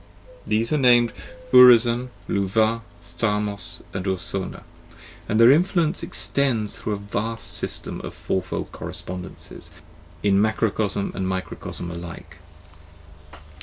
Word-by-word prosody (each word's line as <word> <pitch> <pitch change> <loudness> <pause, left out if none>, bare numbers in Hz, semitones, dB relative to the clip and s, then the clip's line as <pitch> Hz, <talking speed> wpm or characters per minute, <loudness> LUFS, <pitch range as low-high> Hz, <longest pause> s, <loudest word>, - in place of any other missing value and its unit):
.These 110 +5 +1
are 150 - +2
named 120 -2 +5 0.4
Urizen, 125 -1 +7 0.2
Luvah, 110 +3 +1 0.4
Tharmas, 105 -5 0
and 95 - -3
Urthona, 95 0 -4 0.7
and 110 - +1
their 115 +2 +8
influence 170 +1 +2
extends 120 -7 0
through 105 - -3
a - - 0
vast 105 +3 -3
system - - -2
of - - -8
fourfold 95 - -3
correspondences 90 0 -7 0.5
in 100 -1 +4
macrocosm 110 -2 0
and 95 - -3
microcosm 95 -2 -4
alike. 85 0 -9
110 Hz, 105 wpm, -23 LUFS, 95-120 Hz, 0.7 s, their